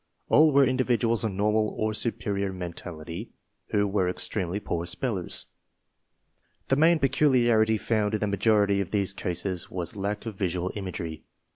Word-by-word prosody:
All 155 +1 +6
were 140 0 +5
individuals 120 -3 +1
of 110 - 0
normal 105 +2 +1
or 110 0 0
superior 100 -3 -1
mentality 85 +1 -7 0.4
who 105 -1 +1
were 95 -2 +1
extremely 90 0 -2
poor 85 -4 -3
spellers. 100 -8 -2 1.2
The 135 - +4
main 165 +4 +5
peculiarity 125 -6 +3
found 110 -1 0
in - - -1
the 105 - 0
majority 100 0 +2
of 95 - -4
these 100 -2 0
cases 90 0 -2
was 90 +3 -2
lack 105 +2 -3
of 115 - -4
visual 90 -1 -2
imagery. 90 -5 -5
105 Hz, 145 wpm, -27 LUFS, 95-115 Hz, 1.2 s, All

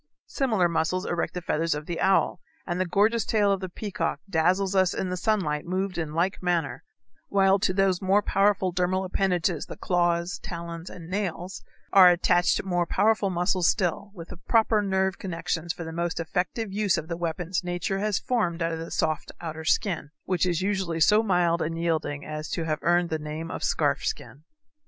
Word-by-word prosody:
Similar 220 -10 +1
muscles 170 +2 -1
erect 175 +1 -2
the 180 - -4
feathers 165 -1 0
of 150 0 -6
the 170 +1 -4
owl, 190 -1 +2 0.3
and 175 +1 -2
the 185 - 0
gorgeous 215 +5 +2
tail 205 -2 +2
of 195 - +1
the 185 -1 -5
peacock 205 +2 -3
dazzles 185 +2 +1
us 185 -2 +3
in 185 - -2
the - - -1
sunlight 180 -7 0
moved 185 0 -2
in 155 -2 -4
like 175 +3 0
manner, 170 -8 -1 0.4
while 195 0 +3
to 190 - +1
those 190 -1 +1
more 195 +2 +3
powerful 195 -2 +2
dermal 185 +1 0
appendages, 180 -3 0
the - - -8
claws, 175 -1 0
talons, 170 0 -7
and 170 -2 -10
nails, 185 -1 -3 0.3
are 185 -2 +9
attached 175 0 +2
more 175 -2 0
powerful 210 +1 +2
muscles 180 0 +1
still, 195 +1 -1
with 165 -2 -9
proper 220 -2 +3
nerve 190 -1 0
connections 170 -2 -3
for 170 - -6
the 160 0 -7
most 170 0 -2
effective 185 +5 -2
use 205 -2 +1
of 155 - -4
the 170 - -3
weapons 175 +2 -2
nature 175 +2 -2
has 210 -1 0
formed 180 -9 -1
out 165 - 0
of 165 - -4
the 165 - -6
soft 155 -1 -1
outer 160 -1 -6
skin, 165 -2 0 0.2
which 185 -1 +1
is 175 0 0
usually 190 -4 -1
so 210 +7 +5
mild 175 -5 +2
and 165 +1 -2
yielding 160 -3 -1
as 155 0 -5
to 165 - -2
have 155 -1 -1
earned 175 0 +2
the 160 - -1
name 155 +2 -6
of - - -5
scarf 145 -2 +1
skin. 145 +4 -5
180 Hz, 190 wpm, -26 LUFS, 165-195 Hz, 0.4 s, are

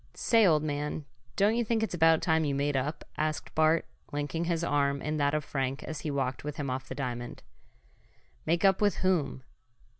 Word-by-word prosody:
"Say, 225 -3 +4
old 155 -3 +3
man, 150 0 -3 0.3
don't 205 +3 +3
you 240 - +1
think 225 0 0
it's 220 - -2
about 165 -1 +4
time 160 -1 +2
you 140 -2 0
made 140 +1 0
up?" 140 +4 -2
asked 155 0 -2
Bart, 160 +1 +3 0.3
linking 145 +3 -2
his 170 -1 -1
arm 140 -3 +1
in 155 +2 -2
that 145 0 +2
of 150 -1 -2
Frank 135 -1 -2
as 155 - -5
he 155 - -4
walked 135 -2 -2
with 150 -1 -4
him 140 -3 -2
off 130 0 -4
the - - -5
diamond. 120 -3 -5 1.0
"Make 170 +3 +1
up 195 +1 +4
with 205 -1 +3
whom?" 155 -8 +1
150 Hz, 200 wpm, -29 LUFS, 140-165 Hz, 1.0 s, Say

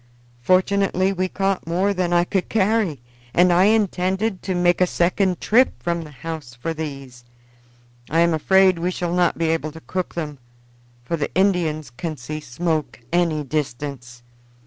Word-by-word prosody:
"Fortunately 190 +4 +2
we 185 0 -1
caught 195 -2 -1
more 185 +4 +1
than 180 -2 -1
I 175 0 +4
could 185 +1 -2
carry, 210 - +1 0.4
and 175 0 +5
I 180 +2 +5
intended 200 -1 +1
to 185 -1 -2
make 175 0 +2
a 180 - +5
second 180 +1 +1
trip 250 +4 +3
from 170 -1 -1
the 155 - -9
house 150 -2 -7
for 165 +7 -3
these. 135 -6 -7 0.9
I 165 +3 +2
am 170 -1 +3
afraid 185 +3 +4
we 175 +2 0
shall 175 -1 -3
not 175 -1 +2
be 165 -1 0
able 155 -1 -2
to 160 - -11
cook 185 +2 -4
them, 150 -5 -4 0.7
for 165 +6 -2
the 145 - -2
Indians 170 -7 +1
can 155 +5 -5
see 145 +5 -6
smoke 155 +3 -2
any 165 -4 +1
distance. 135 -3 -4
175 Hz, 165 wpm, -22 LUFS, 155-185 Hz, 0.9 s, and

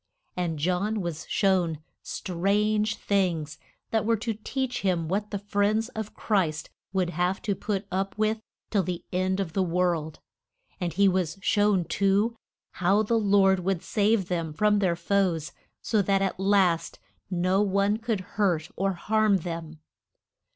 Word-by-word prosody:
And 175 -3 -2
John 185 +7 0
was 170 -2 -5
shown 185 -5 +2 0.2
strange 210 +4 0
things 175 -7 -1 0.3
that 220 -1 +2
were 225 +1 +2
to 225 +2 -2
teach 255 +4 -3
him 175 -4 0
what 205 +4 -1
the 205 - -2
friends 205 +3 0
of 220 -3 -6
Christ 175 -8 0 0.2
would 185 -2 0
have 180 +3 0
to 205 - 0
put 200 +1 -3
up 195 +2 -2
with 215 +1 +1 0.3
till 205 - +3
the 180 0 -4
end 185 +1 0
of 180 -5 -3
the 195 - +1
world. 170 -3 0 0.6
And 175 -2 -1
he 200 +5 +3
was 180 -3 0
shown, 205 -3 +3
too, 200 +6 +1 0.5
how 195 +4 +4
the 230 +2 +1
Lord 195 -2 +4
would 185 -1 -1
save 210 -2 +1
them 165 -4 -2
from 210 +5 +3
their 185 -4 +2
foes, 175 -4 0 0.3
so 220 -2 +2
that 195 0 +2
at 190 -1 -2
last 190 -4 +2 0.3
no 185 +2 +1
one 200 +1 +2
could 225 -3 -2
hurt 180 -5 -1
or 195 +1 0
harm 215 +2 +2
them. 165 -2 -6
195 Hz, 155 wpm, -27 LUFS, 175-210 Hz, 0.6 s, how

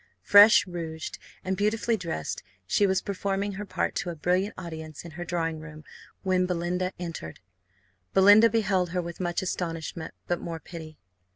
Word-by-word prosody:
Fresh 205 -1 +8
rouged, 165 -3 -6 0.3
and 190 0 0
beautifully 215 +4 +1
dressed, 165 - -4 0.2
she 200 - +3
was 190 -1 +1
performing 200 0 -2
her 200 +1 -6
part - - -1
to 180 - -2
a 170 - -4
brilliant 180 +6 0
audience 160 -2 -7
in 170 - -8
her 175 +3 -6
drawing 165 -2 -2
room 155 -1 -10 0.4
when 185 -1 +2
Belinda 180 +1 -1
entered. 165 - -6 0.7
Belinda 205 +4 +7
beheld 195 -5 +1
her - - +2
with 170 0 -7
much 175 0 -1
astonishment, 165 -2 -4
but 175 -1 -1
more 165 -1 -5
pity. 160 -2 -10
180 Hz, 160 wpm, -27 LUFS, 165-195 Hz, 0.7 s, Fresh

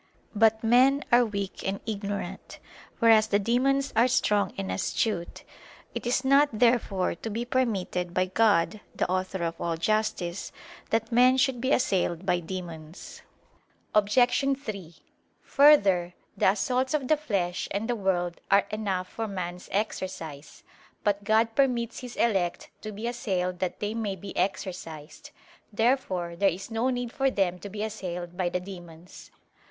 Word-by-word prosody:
But 220 +1 +3
men 260 +5 +4
are 240 +1 +6
weak 200 -4 -4
and 195 +1 -2
ignorant, 205 -2 -5 0.4
whereas 225 -2 +5
the 205 - +2
demons 265 +6 +1
are 230 +3 +5
strong 210 -4 +2
and 95 -1 -3
astute. 170 - -2 0.5
It - - -4
is 255 +2 +1
not 280 +2 +5
therefore 225 -5 +2
to 225 - -7
be 230 +3 -3
permitted 200 -8 -1
by 185 +1 +1
God, 205 0 +2 0.2
the - - 0
author 185 0 -2
of 165 0 -3
all 170 -1 -1
justice, 195 -2 -1 0.4
that 225 +1 0
men 250 +2 +5
should 260 -2 +1
be 260 +2 0
assailed 190 - +1
by 180 -1 +2
demons. 170 -2 -8 0.7
Obj. 210 -1 +2 0.4
3: 200 - -7 0.5
Further, 195 -12 +4 0.2
the - - +3
assaults 255 +7 0
of 275 -4 -2
the 310 - +4
flesh 195 -12 -2
and 205 +3 -2
the 245 - 0
world 180 -4 -1
are 200 0 +5
enough 195 -4 -2
for 225 +3 -4
man's 180 -3 -6
exercise. 175 -8 -4 0.4
But 205 -1 0
God 220 +2 +2
permits 240 -3 +1
His 250 -2 -8
elect 190 -7 0
to 215 - -6
be 210 +3 -6
assailed 185 -7 -2
that 185 -1 -3
they 210 +1 -2
may 215 -4 -2
be 195 +1 -9
exercised. 175 -4 -4 0.4
Therefore 205 -7 0
there 195 +3 +3
is 190 +5 -6
no 225 +3 0
need 245 -2 -2
for 270 0 +2
them 185 -6 0
to 200 - -8
be 210 +1 -4
assailed 180 -5 -5
by 180 -1 0
the 180 - -1
demons. 175 -2 -11
205 Hz, 155 wpm, -27 LUFS, 180-235 Hz, 0.7 s, are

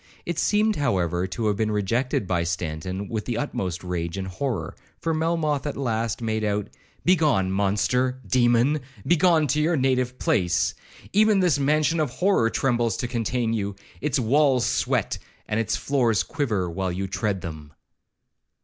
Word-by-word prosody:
It 170 -2 -2
seemed, 215 0 +2
however, 90 - 0
to 100 +5 -3
have 105 -2 +1
been 110 0 0
rejected 105 +3 0
by 90 -2 0
Stanton 85 +3 -3
with 110 0 -3
the 120 -2 -2
utmost 95 -10 -3
rage 85 -1 -3
and 95 -1 -3
horror, 95 - -3 0.2
for 165 - -1
Melmoth 155 -3 0
at 145 - -4
last 115 -3 -1
made 110 -1 -1
out,—'Begone, 105 - 0
monster, 105 +6 +1
demon!—begone 135 - +2
to 150 +2 +1
your 160 +1 +2
native 130 -1 +1
place. 90 -9 +1 0.4
Even 210 0 +4
this 175 -6 +3
mansion 155 +3 +2
of 150 -3 +1
horror 130 - +2
trembles 120 -4 0
to 125 - -2
contain 115 0 -1
you; 100 -3 -2 0.3
its 150 0 0
walls 135 +1 +3
sweat, - - 0 0.3
and 105 0 0
its 110 -1 0
floors 120 -7 +1
quiver, 110 - -1
while 95 +2 -2
you 95 +2 -3
tread 100 0 -2
them.' 80 -4 -8
115 Hz, 150 wpm, -24 LUFS, 95-145 Hz, 0.4 s, Even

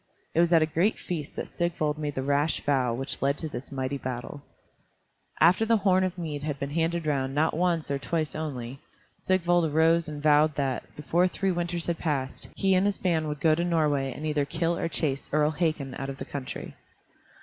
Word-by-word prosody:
It - - +1
was 170 0 +4
at 165 -2 +6
a - - +3
great 170 +7 +1
feast 160 -5 -5
that - - -4
Sigvald 155 -3 -1
made 150 -2 -3
the 130 - -2
rash 145 +2 +1
vow 130 -4 +1
which 130 +4 -3
led 140 +1 +1
to 160 - -4
this 125 -3 -7
mighty 135 +1 -2
battle. 125 +2 -5 1.0
After 180 +7 +5
the 225 0 +3
horn 190 -2 +3
of 185 -1 -2
mead 155 -4 -4
had 145 -1 -3
been 140 0 -3
handed 165 +1 0
round 135 -2 0
not 155 +2 +2
once 170 -3 0
or 140 - 0
twice 155 +2 -2
only, 135 -5 -5 0.4
Sigvald 175 -2 +2
arose 165 +2 +3
and 150 -1 -5
vowed 150 0 +4
that, 135 -3 -1
before 170 +5 +2
three 195 +1 -1
winters 175 -1 -2
had 170 -2 -2
passed, 140 -5 -2
he 195 -1 +2
and 185 +2 +3
his 205 - 0
band 165 -4 0
would 150 -1 -4
go 155 0 +5
to 170 +2 +1
Norway 150 -6 +1
and 150 - -6
either 150 -2 +1
kill 165 +3 -1
or 170 - -1
chase 140 -5 -2
Earl 150 +1 +3
Hakon 155 -4 -1
out 135 +1 -5
of 135 - -6
the 135 - -6
country. 140 -2 -6
155 Hz, 210 wpm, -27 LUFS, 140-170 Hz, 1.0 s, at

